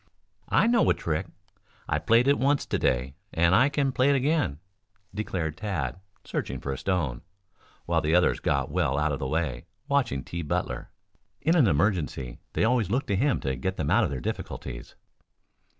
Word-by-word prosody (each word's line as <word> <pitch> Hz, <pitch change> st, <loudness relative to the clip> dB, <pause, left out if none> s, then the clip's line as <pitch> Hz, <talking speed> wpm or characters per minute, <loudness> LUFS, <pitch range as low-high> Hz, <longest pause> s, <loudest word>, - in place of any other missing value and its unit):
"I -, -, +4 dB
know 235 Hz, 0 st, +4 dB
a -, -, +4 dB
trick. 80 Hz, +3 st, -2 dB, 0.6 s
I've 75 Hz, +2 st, -2 dB
played 115 Hz, +3 st, +5 dB
it 140 Hz, -, +4 dB
once 140 Hz, +2 st, +2 dB
to -, -, -1 dB
day 65 Hz, +1 st, 0 dB, 0.2 s
and 85 Hz, +2 st, +3 dB
I 125 Hz, +8 st, +5 dB
can 140 Hz, -2 st, 0 dB
play 130 Hz, +2 st, +2 dB
it 140 Hz, -, +4 dB
again," 140 Hz, -, +1 dB, 0.6 s
declared 90 Hz, -7 st, -3 dB
Tad, 85 Hz, -10 st, -3 dB, 0.3 s
searching -, -, -3 dB
for 70 Hz, -, -4 dB
a -, -, -5 dB
stone, 85 Hz, -11 st, -1 dB, 0.6 s
while 85 Hz, -1 st, +1 dB
the 80 Hz, +2 st, +2 dB
others 90 Hz, -, +3 dB
got 70 Hz, -1 st, 0 dB
well 65 Hz, +2 st, +1 dB
out 75 Hz, +1 st, +1 dB
of 70 Hz, -, -2 dB
the 70 Hz, -, -2 dB
way, 70 Hz, -5 st, -2 dB, 0.2 s
watching 130 Hz, -, +1 dB
T. 85 Hz, +6 st, -5 dB
Butler. 75 Hz, -, -3 dB, 0.5 s
In 165 Hz, +3 st, +3 dB
an 145 Hz, -9 st, +5 dB
emergency 75 Hz, -, 0 dB
they -, -, +1 dB
always 115 Hz, -4 st, +2 dB
looked 125 Hz, +7 st, -1 dB
to 100 Hz, -, +2 dB
him 135 Hz, +6 st, +2 dB
to 65 Hz, -1 st, -1 dB
get 95 Hz, +9 st, -3 dB
them 75 Hz, 0 st, -1 dB
out 120 Hz, -, +5 dB
of 95 Hz, -, 0 dB
their 65 Hz, -3 st, -4 dB
difficulties. -, -, -6 dB
85 Hz, 185 wpm, -27 LUFS, -, 0.6 s, played